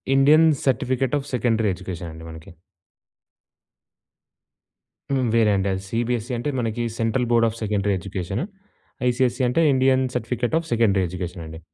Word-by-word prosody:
Indian 150 +4 +6 0.2
certificate 130 +1 0
of 140 - -9
secondary 115 -3 +1
education 90 -2 -7
అండి 80 +1 -11
మనకి. 80 0 -11 2.6
హ్మ్, 130 -2 +1
వేరే 115 -2 +4
అండి 95 0 0
అది 95 0 -3
సీబీఎస్‌సీ 120 +2 -2
అంటే 135 +5 -2
మనకి 115 0 -2 0.2
central 115 +2 0
board 115 -1 +4
of 110 - -9
secondary 100 -1 0
education. 95 - -4 0.7
ICSE 125 +1 0
అంటే 165 +7 +2
Indian 130 0 +3
certificate 125 +3 -1
of 165 - -9
secondary 105 -5 +2
education 90 -1 -6
అండి. 80 0 -9
115 Hz, 140 wpm, -23 LUFS, 95-125 Hz, 2.6 s, Indian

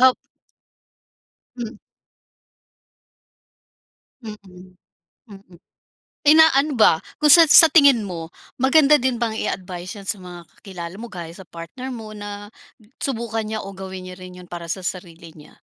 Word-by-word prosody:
Op 260 0 +6 1.4
Hmm. 240 0 -6 2.5
Mm, 215 -1 -8 1.0
mm, 195 -3 -15 0.7
inaano 305 -1 +5
ba, - - +7 0.3
kung 300 - +3
sa 330 +4 +9
sa 320 +1 +8
tingin 280 -7 +5
mo 170 -5 -7 0.2
maganda 285 +3 +4
din 250 -3 -2
bang 225 -2 -2
i - - -3
advice 180 -1 -5
yan 195 - -12
sa 210 - -1
mga 175 -2 -12
kakilala 180 -2 -9
mo 230 0 -10
gaya 170 -2 -8
sa 190 - -12
partner 170 +11 -9
mo 215 -3 -9
na, 205 0 -8 0.5
subukan 225 -4 -3
niya 215 0 -4
o 195 -1 -9
gawin 190 -1 -8
niya 180 - -10
rin 180 -1 -12
'yon 180 - -15
para 175 -1 -8
sa 190 - -6
sarili 170 -3 -8
niya? 150 - -18
205 Hz, 140 wpm, -21 LUFS, 180-250 Hz, 2.5 s, sa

